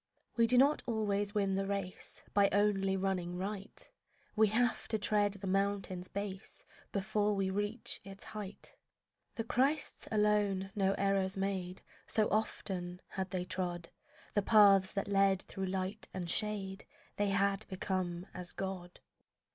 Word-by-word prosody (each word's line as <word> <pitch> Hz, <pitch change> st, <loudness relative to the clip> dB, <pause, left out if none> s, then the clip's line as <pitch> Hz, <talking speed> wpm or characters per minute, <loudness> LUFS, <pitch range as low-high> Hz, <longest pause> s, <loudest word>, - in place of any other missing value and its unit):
We 230 Hz, -1 st, +4 dB
do 250 Hz, +2 st, +5 dB
not 280 Hz, +4 st, +5 dB
always 205 Hz, -2 st, 0 dB
win 195 Hz, -2 st, +2 dB
the 195 Hz, 0 st, 0 dB
race 195 Hz, -2 st, -4 dB
By 200 Hz, -1 st, +5 dB
only 195 Hz, -1 st, +2 dB
running 185 Hz, -2 st, -1 dB
right; 195 Hz, +1 st, -5 dB, 0.5 s
We 220 Hz, 0 st, +5 dB
have 235 Hz, +3 st, +1 dB
to 220 Hz, -, 0 dB
tread 205 Hz, -1 st, +2 dB
the 200 Hz, -1 st, -8 dB
mountain's 195 Hz, -1 st, 0 dB
base 200 Hz, -1 st, -6 dB, 0.3 s
Before 210 Hz, +1 st, +1 dB
we 195 Hz, -1 st, 0 dB
reach 205 Hz, +4 st, -2 dB
its 195 Hz, 0 st, -10 dB
height. 210 Hz, -2 st, -8 dB, 0.6 s
The 225 Hz, -, -2 dB
Christs 270 Hz, +6 st, 0 dB
alone 210 Hz, -3 st, +2 dB
no 195 Hz, -1 st, +2 dB
errors 195 Hz, 0 st, +1 dB
made; 190 Hz, -2 st, -2 dB, 0.2 s
So 215 Hz, -1 st, +2 dB
often 185 Hz, -4 st, -2 dB
had 190 Hz, -1 st, -3 dB
they 180 Hz, -1 st, -2 dB
trod 175 Hz, -2 st, -3 dB, 0.4 s
The 205 Hz, -, +3 dB
paths 195 Hz, -2 st, +6 dB
that 195 Hz, -, -2 dB
lead 195 Hz, -1 st, +3 dB
through 190 Hz, -1 st, -4 dB
light 190 Hz, +3 st, -3 dB
and 180 Hz, -2 st, -3 dB
shade, 195 Hz, +1 st, 0 dB, 0.3 s
They 205 Hz, 0 st, +2 dB
had 195 Hz, +1 st, +1 dB
become 185 Hz, -2 st, -2 dB
as 180 Hz, -1 st, -5 dB
God. 185 Hz, -2 st, -5 dB
195 Hz, 145 wpm, -34 LUFS, 190-210 Hz, 0.6 s, paths